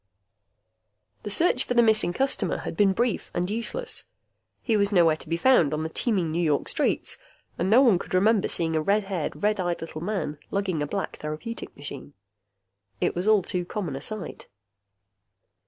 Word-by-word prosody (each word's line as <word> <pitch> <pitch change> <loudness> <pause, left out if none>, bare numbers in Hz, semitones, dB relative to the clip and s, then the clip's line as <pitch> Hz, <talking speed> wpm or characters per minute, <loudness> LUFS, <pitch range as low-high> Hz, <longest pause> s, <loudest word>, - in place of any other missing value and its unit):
The - - -6
search 255 - +2
for 245 - -3
the 240 - +6
missing 215 -5 +4
customer 245 -4 +1
had - - -6
been 200 +2 +4
brief 235 +2 -1
and 175 +1 0
useless. 355 - -2 0.6
He 225 - +1
was 200 0 +2
nowhere 170 -5 +4
to 155 - -12
be 165 - 0
found 170 - +4
on 155 - -3
the 160 - -3
teeming 185 -3 0
New 170 +2 -1
York 150 -4 +1
streets - - 0 0.4
and 180 - 0
no 240 +6 +6
one 220 -9 +4
could - - -5
remember 205 +2 +3
seeing 165 -1 0
a 155 - +2
red 205 +6 +2
haired, 190 -2 -4
red 210 0 +2
eyed 175 -2 -1
little 165 -1 -7
man 170 -6 -3
lugging 190 -6 -1
a 145 - -1
black 195 +5 -4
therapeutic 155 +10 -6
machine. 145 0 -8 0.8
It - - 0
was 180 +4 -2
all 215 -3 +4
too 180 0 -2
common 175 -5 -4
a 135 - -6
sight. 215 +3 -5
190 Hz, 185 wpm, -26 LUFS, 165-215 Hz, 0.8 s, the